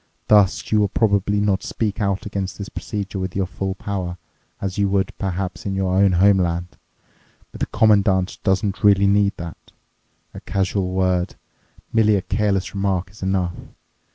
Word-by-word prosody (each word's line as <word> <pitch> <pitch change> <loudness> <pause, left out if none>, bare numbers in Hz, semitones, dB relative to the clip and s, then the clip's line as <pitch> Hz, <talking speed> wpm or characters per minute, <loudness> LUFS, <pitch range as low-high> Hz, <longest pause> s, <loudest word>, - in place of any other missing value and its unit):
Thus, 105 -3 +4
you 110 - +4
will 105 - +3
probably 100 -1 +1
not 100 -1 +1
speak 110 -1 -3
out 100 -1 -1
against 100 -2 -4
the 100 - -5
procedure 100 -2 -5
with 95 -2 -4
your 95 -1 +1
full 95 +1 -4
power, 95 -3 -4 0.4
as 95 0 -3
you 100 -1 +2
would 95 -1 0
perhaps 95 -1 -3
in 100 -1 -3
your 95 -1 0
own 95 0 +4
homeland. 90 -2 +3 0.8
But - - -11
the - - -1
Commandant 100 -4 +2
doesn't 100 +1 0
really 100 -1 +5
need 100 0 +3
that. 85 -1 -9 0.6
A - - -8
casual 95 -1 -1
word, 95 -1 0 0.6
merely 110 -2 +4
a 95 - -1
careless 95 +1 0
remark, 95 -2 -1
is 105 - -17
enough. 95 -2 0
95 Hz, 160 wpm, -21 LUFS, 95-100 Hz, 0.8 s, really